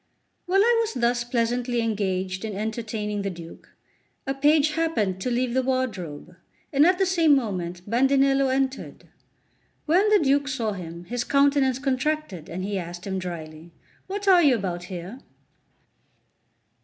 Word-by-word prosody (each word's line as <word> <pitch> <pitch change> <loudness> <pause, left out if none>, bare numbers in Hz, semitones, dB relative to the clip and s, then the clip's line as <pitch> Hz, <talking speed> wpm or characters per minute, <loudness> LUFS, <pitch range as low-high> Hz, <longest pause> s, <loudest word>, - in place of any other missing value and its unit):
LXX - - -47
WHILE 385 +2 +3
I 475 +1 +4
was 450 0 -2
thus 240 0 +1
pleasantly 240 0 -1
engaged 190 -4 -2
in 215 -3 -4
entertaining 215 -1 -3
the 200 - -2
Duke, 170 -2 -11 0.6
a 270 - -1
page 295 +2 +3
happened 230 - -1
to 250 - -1
leave 245 0 0
the 260 - +2
wardrobe, 205 - -3 0.4
and 285 +4 +5
at 365 0 +3
the 385 - +2
same 335 -5 +4
moment 180 -7 -3
Bandinello 270 +3 +3
entered. 265 0 -3 0.8
When 370 +7 +3
the 425 - +6
Duke 285 -4 +2
saw 235 -5 -1
him, 170 -3 -7
his 240 +6 -3
countenance 280 -2 +2
contracted, 270 - -2
and 185 +2 -5
he 200 0 -2
asked 175 0 -7
him 190 -1 -2
drily: 165 -2 -8 0.3
"What 405 +1 -5
are 365 -2 +7
you 285 -6 +5
about 180 -5 -4
here?" 185 +7 -7
240 Hz, 155 wpm, -25 LUFS, 190-280 Hz, 0.8 s, are